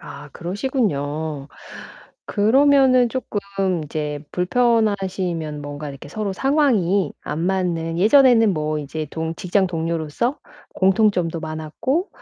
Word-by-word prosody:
아 145 0 -10
그러시군요. 160 - -2 0.8
그러면은 255 +3 +4
쪼끔 200 -7 -2
이제 150 -1 -4
불편하시면 190 -7 0
뭔가 145 0 -6
이렇게 140 +1 -11
서로 205 +4 -3
상황이 205 - +2
안 155 - -4
맞는 170 -3 -1
예전에는 225 -2 +5
뭐 155 0 -1
인제 150 +2 -5
동 160 0 -3
직장 190 +2 +1
동료로서 165 - -2 0.4
공통점도 190 -4 +2
많았고 160 - -2
180 Hz, 260 characters per minute, -21 LUFS, 155-220 Hz, 0.8 s, 예전에는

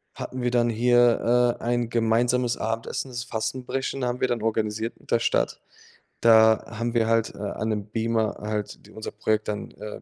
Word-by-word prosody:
hatten 130 0 -6
wir 125 - +1
dann 120 -1 +2
hier, 120 +1 +3
äh, - - -12
ein 120 -1 0
gemeinsames 120 +2 +1
Abendessen, 115 +4 -3
das 120 -1 -4
Fastenbrechen 125 +3 -3
haben 125 0 -2
wir 130 - +3
dann 120 -2 -1
organisiert 110 0 -1
mit - - -16
der 115 - +4
Stadt. 115 - 0 0.6
Da 110 -1 +6
haben 115 +1 -2
wir 115 -1 +3
halt, 115 -2 +1
äh, - - -12
an 105 +2 -3
'nem 105 -2 -2
Beamer 110 0 -1
halt 105 -1 -4 0.2
unser 110 - -6
Projekt 110 0 -1
dann, 105 0 -4
äh, 105 0 -9
115 Hz, 180 wpm, -25 LUFS, 110-120 Hz, 0.6 s, Da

